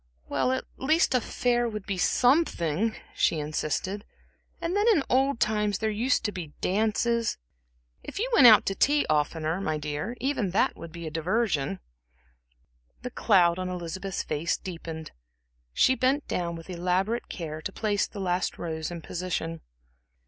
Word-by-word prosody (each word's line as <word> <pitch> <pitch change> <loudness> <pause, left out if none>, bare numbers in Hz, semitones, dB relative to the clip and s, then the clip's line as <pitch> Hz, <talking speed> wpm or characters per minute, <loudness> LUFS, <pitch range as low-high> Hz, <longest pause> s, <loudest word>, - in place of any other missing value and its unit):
"Well, 255 - +1
at 260 - -1
least, 310 +4 +2
a 255 - +3
fair 240 +1 0
would 210 -3 -6
be 195 -3 -3
something," 225 - +2 0.2
she 165 - +2
insisted 155 +6 -2 0.6
"and 335 +3 -2
then 415 +2 +2
in 405 -12 +5
old 265 0 +2
times 210 -2 +1
there 220 0 -1
used 235 +5 +1
to 210 - 0
be 170 -6 -7
dances. 225 +3 +1 0.7
If - - -8
you 450 +5 0
went 265 - +8
out 220 -2 +8
to 195 - 0
tea 290 +8 +3
oftener, 155 +3 0
my 155 -5 -1
dear 150 +10 -4
even 260 -7 0
that 185 - +2
would 170 -1 -9
be 170 0 -8
a 155 - -5
diversion." 160 - 0 1.2
The - - -4
cloud 180 -5 +3
on 185 0 -2
Elizabeth's 180 +2 -4
face 155 +2 -1
deepened. 165 -3 -7 0.6
She 260 - +4
bent 265 +3 +1
down 170 -1 -2
with 165 0 -10
elaborate 185 +5 -1
care 155 -3 -5
to 190 - -4
place 205 0 0
the 205 - -9
last 180 -1 -1
rose 160 -2 -4
in 170 -2 -7
position. 165 -2 -3
190 Hz, 160 wpm, -27 LUFS, 165-235 Hz, 1.2 s, went